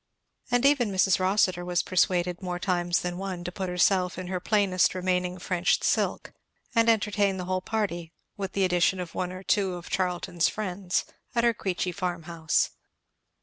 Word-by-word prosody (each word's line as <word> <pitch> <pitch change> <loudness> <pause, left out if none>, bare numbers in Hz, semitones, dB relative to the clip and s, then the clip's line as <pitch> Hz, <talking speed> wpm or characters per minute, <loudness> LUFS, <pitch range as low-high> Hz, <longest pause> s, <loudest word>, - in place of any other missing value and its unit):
And 245 +2 +2
even 280 -6 +4
Mrs. 190 0 +3
Rossitur 185 -1 +2
was 175 -1 0
persuaded, 180 -1 +1
more 180 -1 -3
times 175 -1 0
than 175 0 -4
one, 190 -2 -4
to 180 - -4
put 190 0 -4
herself 180 +1 +2
in 185 -1 -5
her 185 -1 -2
plainest 190 -2 +2
remaining 180 0 0
French 180 -1 0
silk - - 0 0.4
and 230 -1 +4
entertain 205 -3 +2
the 180 - -4
whole 185 0 -1
party, 180 -6 -2 0.2
with 195 -3 -5
the 195 -1 +2
addition 180 +1 +2
of 175 -2 -5
one 180 -1 -2
or 185 +1 -8
two 195 -2 +1
of 175 0 -9
Charlton's 180 -2 0
friends, 185 -3 -2 0.3
at 235 - +2
her 235 -1 +4
Queechy 185 -3 -2
farm 180 -3 -3
house. 165 -2 0
185 Hz, 175 wpm, -27 LUFS, 180-195 Hz, 0.4 s, even